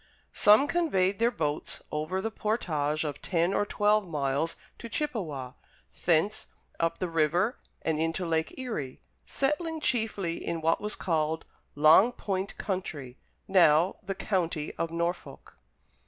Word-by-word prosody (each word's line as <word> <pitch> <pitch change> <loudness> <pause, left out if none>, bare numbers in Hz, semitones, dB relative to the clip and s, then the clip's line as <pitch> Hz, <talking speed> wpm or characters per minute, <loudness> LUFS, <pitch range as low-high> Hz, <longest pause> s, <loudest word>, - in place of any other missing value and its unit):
Some 210 +7 +6
conveyed 205 - +1
their 230 +1 +4
boats 155 -9 -3
over 155 +5 -2
the 225 - -2
portage 155 -10 -1
of 150 -2 -4
ten 175 +1 +1
or 205 - +1
twelve 210 -1 +2
miles 145 0 -1 0.2
to 235 - -7
Chippewa, 175 - -3 0.5
thence 175 +5 +2 0.3
up 165 0 0
the 185 - -2
river 170 - +1 0.2
and 160 -1 0
into 165 +3 -1
Lake 160 -1 -1
Erie, 220 - -4 0.3
settling 315 +4 -1
chiefly 220 - -1
in 170 -1 -2
what 165 +1 +1
was 210 0 -2
called 160 -2 -1 0.3
"Long 155 +10 +6
Point 195 -3 -3
Country," 150 - -4 0.3
now 175 -2 +4
the 195 -1 -4
County 170 -7 -1
of 165 - -2
Norfolk. 170 - -4
175 Hz, 135 wpm, -28 LUFS, 155-210 Hz, 0.5 s, Some